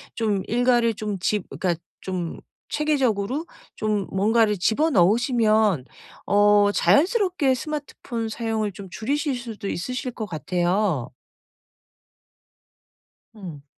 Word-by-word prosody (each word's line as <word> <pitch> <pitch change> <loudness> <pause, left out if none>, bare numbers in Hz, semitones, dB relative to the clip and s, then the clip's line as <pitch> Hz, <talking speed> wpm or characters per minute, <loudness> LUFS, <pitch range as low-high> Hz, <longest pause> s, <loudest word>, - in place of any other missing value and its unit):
좀 210 -4 0
일과를 240 -1 +2
좀 210 -3 -4
집 205 +1 -1
그러니까 175 -3 -1 0.3
좀 180 -3 -4 0.3
체계적으로 270 -2 0 0.3
좀 210 -3 -1
뭔가를 210 +1 +2
집어 260 - +2
넣으시면 215 - +3 0.4
어 205 0 +4
자연스럽게 360 - +3
스마트폰 255 -4 -4
사용을 220 -2 -2
좀 195 0 -10
줄이실 280 - -1
수도 230 -4 -6
있으실 250 +7 -3
것 225 -2 -5
같아요. 175 - -1 2.2
응. 170 -9 -9
215 Hz, 230 characters per minute, -24 LUFS, 195-250 Hz, 2.2 s, 어